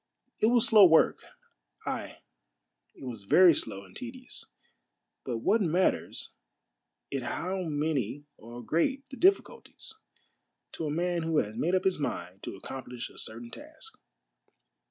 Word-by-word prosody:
It 215 Hz, -, +4 dB
was 240 Hz, -1 st, +4 dB
slow 215 Hz, -2 st, +7 dB
work, 160 Hz, -1 st, +4 dB, 0.7 s
ay, -, -, -5 dB, 0.7 s
it -, -, -13 dB
was 115 Hz, -6 st, -7 dB
very 175 Hz, -, +7 dB
slow 100 Hz, -8 st, -3 dB
and -, -, -18 dB
tedious, 250 Hz, 0 st, -8 dB, 0.8 s
but 120 Hz, -3 st, -4 dB
what 225 Hz, +1 st, +3 dB
matters 180 Hz, +1 st, 0 dB, 0.8 s
it 135 Hz, -1 st, -2 dB
how 180 Hz, +10 st, -3 dB
many 145 Hz, -3 st, -2 dB
or 120 Hz, +2 st, -10 dB
great 265 Hz, -, 0 dB
the -, -, -6 dB
difficulties, 395 Hz, +3 st, 0 dB, 0.8 s
to 160 Hz, -, -4 dB
a -, -, -2 dB
man 175 Hz, +3 st, 0 dB
who 160 Hz, -1 st, 0 dB
has 105 Hz, -5 st, 0 dB
made 175 Hz, +9 st, +1 dB
up 185 Hz, -, +1 dB
his 190 Hz, -4 st, +1 dB
mind 90 Hz, -8 st, -4 dB
to -, -, -6 dB
accomplish 125 Hz, +4 st, -7 dB
a -, -, -9 dB
certain 115 Hz, +1 st, -5 dB
task -, -, -11 dB
155 Hz, 140 wpm, -29 LUFS, 120-190 Hz, 0.8 s, slow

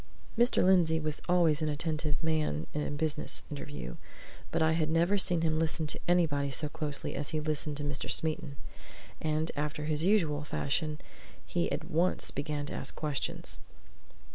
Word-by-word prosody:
Mr. 240 Hz, +2 st, +4 dB
Lindsey 175 Hz, -4 st, +5 dB
was 155 Hz, -1 st, -2 dB
always 165 Hz, -4 st, +4 dB
an 155 Hz, -, +1 dB
attentive 155 Hz, +1 st, -1 dB
man 155 Hz, -, +1 dB
in 150 Hz, -, -1 dB
a -, -, -2 dB
business 150 Hz, +1 st, 0 dB
interview, 145 Hz, -, -6 dB, 0.5 s
but 165 Hz, -, 0 dB
I 160 Hz, 0 st, +4 dB
had 160 Hz, -1 st, +1 dB
never 170 Hz, +5 st, +3 dB
seen 175 Hz, -3 st, +3 dB
him 160 Hz, -1 st, +2 dB
listen 160 Hz, 0 st, +1 dB
to 150 Hz, -, -2 dB
anybody 155 Hz, -6 st, +3 dB
so 145 Hz, +3 st, 0 dB
closely 145 Hz, -1 st, -4 dB
as 140 Hz, +1 st, -3 dB
he 155 Hz, -, -1 dB
listened 150 Hz, -1 st, -2 dB
to 145 Hz, -, -1 dB
Mr. 145 Hz, -1 st, -3 dB
Smeaton. 155 Hz, -2 st, -2 dB, 0.7 s
And 155 Hz, +1 st, 0 dB
after 150 Hz, +1 st, -2 dB
his 150 Hz, -1 st, +2 dB
usual 165 Hz, -6 st, +2 dB
fashion, 150 Hz, +1 st, -1 dB, 0.5 s
he 175 Hz, -1 st, 0 dB
at -, -, -1 dB
once 170 Hz, +2 st, +2 dB
began 145 Hz, 0 st, -2 dB
to -, -, -6 dB
ask -, -, -3 dB
questions. 150 Hz, -3 st, -3 dB
155 Hz, 165 wpm, -31 LUFS, 145-165 Hz, 0.7 s, Lindsey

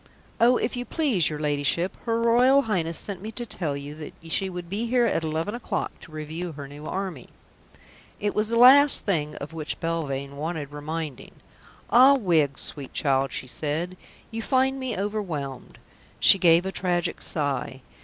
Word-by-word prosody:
"Oh, 240 Hz, +2 st, +5 dB
if 230 Hz, -, -2 dB
you 245 Hz, -, -3 dB
please, 250 Hz, -, +1 dB
your 150 Hz, -, -4 dB
Ladyship, 150 Hz, +4 st, 0 dB
her 230 Hz, -1 st, 0 dB
Royal 250 Hz, +4 st, +4 dB
Highness 170 Hz, -8 st, -1 dB
sent 195 Hz, -3 st, -5 dB
me 215 Hz, +2 st, -6 dB
to 240 Hz, -, -5 dB
tell 155 Hz, -10 st, 0 dB
you 140 Hz, +1 st, -7 dB
that 155 Hz, -1 st, -9 dB, 0.2 s
she 190 Hz, +2 st, 0 dB
would 180 Hz, -1 st, -7 dB
be 210 Hz, +6 st, -3 dB
here 245 Hz, 0 st, +3 dB
at 185 Hz, -7 st, 0 dB
eleven 160 Hz, +5 st, -2 dB
o'clock 240 Hz, 0 st, -3 dB
to -, -, -14 dB
review 155 Hz, +3 st, -5 dB
her 140 Hz, -1 st, -8 dB
new 145 Hz, +2 st, -10 dB
army." 185 Hz, -9 st, -5 dB, 0.9 s
It 205 Hz, 0 st, -1 dB
was 210 Hz, +1 st, 0 dB
the 230 Hz, -, +1 dB
last 275 Hz, +4 st, +7 dB
thing 150 Hz, -6 st, -1 dB
of 145 Hz, +3 st, -7 dB
which 155 Hz, -2 st, -4 dB
Belvane 140 Hz, -4 st, -3 dB
wanted 155 Hz, -1 st, -4 dB
reminding. 150 Hz, -1 st, -6 dB, 0.6 s
"Ah, 260 Hz, +3 st, +7 dB
Wiggs, 160 Hz, -, +1 dB
sweet 140 Hz, -3 st, -1 dB
child," 135 Hz, -2 st, +1 dB
she -, -, -5 dB
said, 155 Hz, +7 st, -3 dB, 0.4 s
"you 225 Hz, 0 st, -4 dB
find 265 Hz, +2 st, +1 dB
me 260 Hz, -5 st, -3 dB
overwhelmed." 175 Hz, -, -4 dB, 0.4 s
She 195 Hz, -, +6 dB
gave 170 Hz, 0 st, +5 dB
a 190 Hz, -, -2 dB
tragic 175 Hz, -2 st, -1 dB
sigh. 135 Hz, -3 st, -2 dB
170 Hz, 175 wpm, -25 LUFS, 150-225 Hz, 0.9 s, last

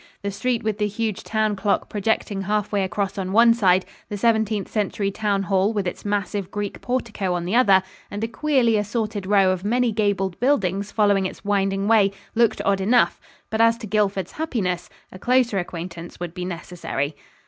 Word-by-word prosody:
The 200 Hz, -, -2 dB
street 235 Hz, +4 st, -1 dB
with 215 Hz, -1 st, -2 dB
the 210 Hz, -, +2 dB
huge 215 Hz, 0 st, -3 dB
town 215 Hz, -1 st, 0 dB
clock 200 Hz, +1 st, 0 dB
projecting 205 Hz, -1 st, -1 dB
half 210 Hz, +1 st, -1 dB
way 200 Hz, -2 st, +1 dB
across 195 Hz, +1 st, -2 dB
on 185 Hz, -1 st, -3 dB
one 230 Hz, +1 st, +7 dB
side, 190 Hz, -5 st, +3 dB, 0.2 s
the 205 Hz, -, -4 dB
Seventeenth 220 Hz, -2 st, +1 dB
Century 200 Hz, -1 st, -1 dB
Town 200 Hz, -1 st, 0 dB
Hall 195 Hz, +2 st, +1 dB
with 205 Hz, -3 st, -1 dB
its 180 Hz, -, -4 dB
massive 205 Hz, -2 st, -2 dB
Greek 205 Hz, -1 st, -4 dB
portico 220 Hz, -7 st, -2 dB
on 175 Hz, -1 st, -3 dB
the 190 Hz, +6 st, -1 dB
other, 195 Hz, -6 st, +5 dB, 0.3 s
and 205 Hz, +2 st, -5 dB
a -, -, 0 dB
queerly 240 Hz, -2 st, +2 dB
assorted 210 Hz, -1 st, -2 dB
row 195 Hz, -2 st, +4 dB
of 185 Hz, 0 st, -3 dB
many 240 Hz, +3 st, +1 dB
gabled 200 Hz, -4 st, 0 dB
buildings 200 Hz, -7 st, +1 dB
following 200 Hz, -3 st, +2 dB
its -, -, -11 dB
winding 195 Hz, -1 st, 0 dB
way, 215 Hz, -3 st, +5 dB, 0.2 s
looked 235 Hz, -1 st, +2 dB
odd 195 Hz, -1 st, +2 dB
enough, 235 Hz, +5 st, +3 dB, 0.3 s
but 220 Hz, +1 st, +1 dB
as 230 Hz, 0 st, +4 dB
to 230 Hz, -, -8 dB
Guildford's 200 Hz, -3 st, 0 dB
happiness, 205 Hz, -, -2 dB, 0.2 s
a 185 Hz, -, -11 dB
closer 245 Hz, -3 st, +2 dB
acquaintance 175 Hz, -1 st, -7 dB
would 175 Hz, -2 st, -5 dB
be 180 Hz, 0 st, -5 dB
necessary. 170 Hz, -5 st, -4 dB
205 Hz, 185 wpm, -23 LUFS, 190-220 Hz, 0.3 s, one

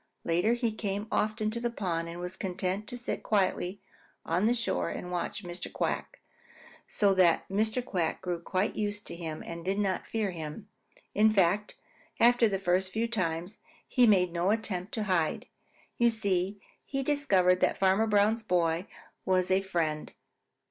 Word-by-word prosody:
Later 175 Hz, +7 st, +2 dB
he 235 Hz, -2 st, 0 dB
came 205 Hz, -1 st, -3 dB
often 215 Hz, 0 st, 0 dB
to 235 Hz, -, -3 dB
the 240 Hz, 0 st, -1 dB
pond 170 Hz, -7 st, -2 dB
and 170 Hz, +1 st, -7 dB
was 180 Hz, +1 st, -5 dB
content 190 Hz, +2 st, -3 dB
to 245 Hz, -, -6 dB
sit 245 Hz, -, -4 dB
quietly 195 Hz, -2 st, 0 dB, 0.4 s
on 180 Hz, +6 st, +2 dB
the 240 Hz, -, +3 dB
shore 90 Hz, -, -1 dB
and 180 Hz, -, -6 dB
watch 180 Hz, +3 st, -3 dB
Mr. 175 Hz, 0 st, -6 dB
Quack, -, -, -3 dB, 0.7 s
so 200 Hz, -2 st, +3 dB
that 180 Hz, -3 st, +4 dB
Mr. 220 Hz, +5 st, 0 dB
Quack 175 Hz, -8 st, -1 dB
grew 180 Hz, -2 st, -3 dB
quite 185 Hz, +4 st, -1 dB
used 205 Hz, -1 st, -2 dB
to -, -, -7 dB
him 160 Hz, -2 st, -5 dB
and 170 Hz, 0 st, -7 dB
did 190 Hz, +3 st, -1 dB
not 195 Hz, -3 st, -1 dB
fear 215 Hz, -4 st, -1 dB
him 160 Hz, +4 st, -7 dB, 0.3 s
at -, -, -25 dB
all. -, -, -38 dB, 0.2 s
In -, -, +4 dB
fact, 200 Hz, +1 st, +2 dB, 0.4 s
after 240 Hz, 0 st, +6 dB
the 195 Hz, -, 0 dB
first 185 Hz, 0 st, +1 dB
few 225 Hz, +4 st, 0 dB
times, 185 Hz, -3 st, -2 dB, 0.3 s
he 250 Hz, -2 st, +4 dB
made 180 Hz, -5 st, +4 dB
no 175 Hz, +2 st, +1 dB
attempt 205 Hz, -3 st, -1 dB
to 220 Hz, -, -1 dB
hide. 180 Hz, -6 st, 0 dB, 0.5 s
You 235 Hz, 0 st, +5 dB
see 200 Hz, -3 st, 0 dB, 0.2 s
he 270 Hz, 0 st, -3 dB
discovered 195 Hz, -11 st, +3 dB
that -, -, +2 dB
Farmer 195 Hz, +3 st, +3 dB
Brown's 210 Hz, +2 st, +3 dB
boy 175 Hz, -3 st, +1 dB, 0.4 s
was 185 Hz, -1 st, +1 dB
a 190 Hz, +1 st, +4 dB
friend. 165 Hz, -5 st, -2 dB
190 Hz, 175 wpm, -29 LUFS, 175-215 Hz, 0.7 s, after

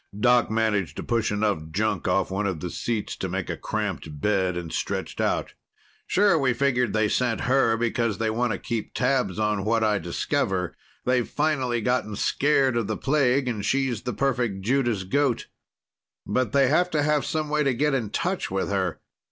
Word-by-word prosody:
Doc 125 Hz, 0 st, +4 dB
managed 105 Hz, -8 st, 0 dB
to -, -, -4 dB
push 115 Hz, -3 st, 0 dB
enough 105 Hz, -7 st, -1 dB
junk 100 Hz, +2 st, -1 dB
off 95 Hz, +1 st, +1 dB
one 100 Hz, +2 st, -1 dB
of 90 Hz, -5 st, -2 dB
the 90 Hz, +2 st, -5 dB
seats 115 Hz, -3 st, -3 dB
to 95 Hz, -, -4 dB
make 95 Hz, 0 st, -3 dB
a -, -, -3 dB
cramped 75 Hz, -2 st, -4 dB
bed, 95 Hz, -1 st, +1 dB
and 85 Hz, -2 st, -5 dB
stretched -, -, -3 dB
out. -, -, -1 dB, 0.5 s
"Sure, 195 Hz, -4 st, +4 dB
we 130 Hz, -3 st, +2 dB
figured 125 Hz, -3 st, +1 dB
they 110 Hz, 0 st, +2 dB
sent 120 Hz, +1 st, 0 dB
her 125 Hz, -3 st, +3 dB
because 115 Hz, -2 st, 0 dB
they 110 Hz, 0 st, 0 dB
want 120 Hz, +1 st, 0 dB
to -, -, -1 dB
keep 115 Hz, -3 st, -4 dB
tabs 125 Hz, -7 st, +1 dB
on 105 Hz, -2 st, 0 dB
what 115 Hz, +2 st, +1 dB
I 105 Hz, -2 st, +2 dB
discover. 90 Hz, +1 st, -1 dB, 0.3 s
They've 125 Hz, -1 st, +1 dB
finally 135 Hz, -6 st, 0 dB
gotten 115 Hz, -3 st, 0 dB
scared 135 Hz, +2 st, +2 dB
of 115 Hz, -4 st, 0 dB
the 110 Hz, -, -2 dB
plague, 135 Hz, -2 st, +2 dB
and 110 Hz, -5 st, -2 dB
she's 130 Hz, -1 st, 0 dB
the 125 Hz, -1 st, -3 dB
perfect 120 Hz, -7 st, 0 dB
Judas 120 Hz, -2 st, +1 dB
goat. 130 Hz, +5 st, 0 dB, 0.8 s
But 125 Hz, -4 st, 0 dB
they 135 Hz, +1 st, +4 dB
have 175 Hz, +6 st, +3 dB
to 150 Hz, -4 st, +1 dB
have 150 Hz, -1 st, +2 dB
some 155 Hz, -1 st, -2 dB
way 150 Hz, 0 st, +1 dB
to 135 Hz, -4 st, +1 dB
get 150 Hz, +3 st, +1 dB
in 120 Hz, -6 st, -1 dB
touch 180 Hz, -, -2 dB
with 95 Hz, 0 st, -1 dB
her. 95 Hz, -4 st, -1 dB
115 Hz, 190 wpm, -25 LUFS, 100-135 Hz, 0.8 s, Doc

